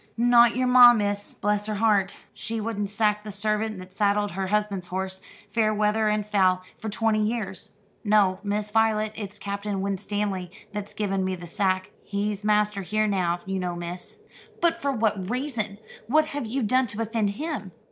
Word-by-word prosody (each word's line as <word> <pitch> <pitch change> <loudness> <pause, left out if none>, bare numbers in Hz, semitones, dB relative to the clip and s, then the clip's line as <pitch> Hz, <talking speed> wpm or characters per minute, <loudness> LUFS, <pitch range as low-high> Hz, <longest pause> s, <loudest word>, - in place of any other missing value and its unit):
"Not 240 0 +5
your 255 +1 +1
ma, 250 -1 +9
miss, 205 -2 -1
bless 210 0 -1
her 215 - -2
heart. 205 -2 +2 0.2
She 225 0 -4
wouldn't 210 -2 -2
sack 210 0 +1
the 210 - -6
servant 215 +1 -1
that 185 0 -11
saddled 205 0 +1
her 190 +1 -3
husband's 205 -2 -1
horse, 190 +1 -4 0.3
fair 220 -1 +2
weather 215 +1 +2
and 210 -1 0
foul, 185 -3 +2 0.2
for 220 - -4
twenty 220 +1 +1
years. 210 -4 -3 0.3
No, 205 -3 +3
Miss 210 0 -2
Voylet, 215 -1 +2
it's 205 -1 -7
Captain 200 0 -3
Winstanley 195 -1 -2 0.2
that's 205 0 -6
given 195 -2 -1
me 185 0 -1
the 175 -1 -9
sack. 185 +1 -1
He's 205 0 -2
master 210 -1 +2
here, 215 +3 0
now, 180 -4 0
you 190 0 -2
know, 180 -1 -2
miss." 175 +1 -7 0.4
"But 335 -1 +1
for 280 - +1
what 215 -6 0
reason? 235 -5 -2 0.3
What 305 +6 +4
have 285 -5 -3
you 255 +3 -1
done 255 +4 +2
to 210 +1 -5
offend 225 -2 0
him?" 295 - -4
210 Hz, 175 wpm, -25 LUFS, 195-220 Hz, 0.4 s, ma